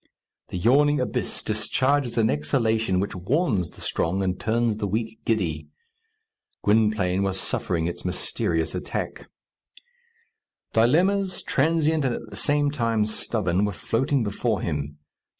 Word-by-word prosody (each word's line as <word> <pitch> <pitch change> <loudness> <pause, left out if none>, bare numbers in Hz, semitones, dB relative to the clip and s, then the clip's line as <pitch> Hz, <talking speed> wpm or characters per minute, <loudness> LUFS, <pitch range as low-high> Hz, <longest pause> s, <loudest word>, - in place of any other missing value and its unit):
The - - -5
yawning 145 +9 +4
abyss 125 -5 -2
discharges 135 -2 0
an 110 -1 +3
exhalation 110 - +1
which 100 +2 -2
warns 100 - 0
the - - -15
strong 95 +4 -1
and 90 -1 -1
turns 115 -1 0
the 105 - -1
weak 110 +2 -3
giddy. 90 -9 0 1.0
Gwynplaine 105 -3 +2
was 95 -1 0
suffering 85 -3 -1
its 85 - -4
mysterious 80 -1 -1
attack. - - -4 1.4
Dilemmas, 185 - +2
transient 160 +1 +2
and 125 -3 +1
at 115 - -8
the - - -8
same 145 -1 +2
time 115 -6 +1
stubborn, 105 -4 -1
were 105 - +1
floating 130 - 0
before 105 0 -1
him. 75 -2 -3
110 Hz, 130 wpm, -25 LUFS, 95-130 Hz, 1.4 s, yawning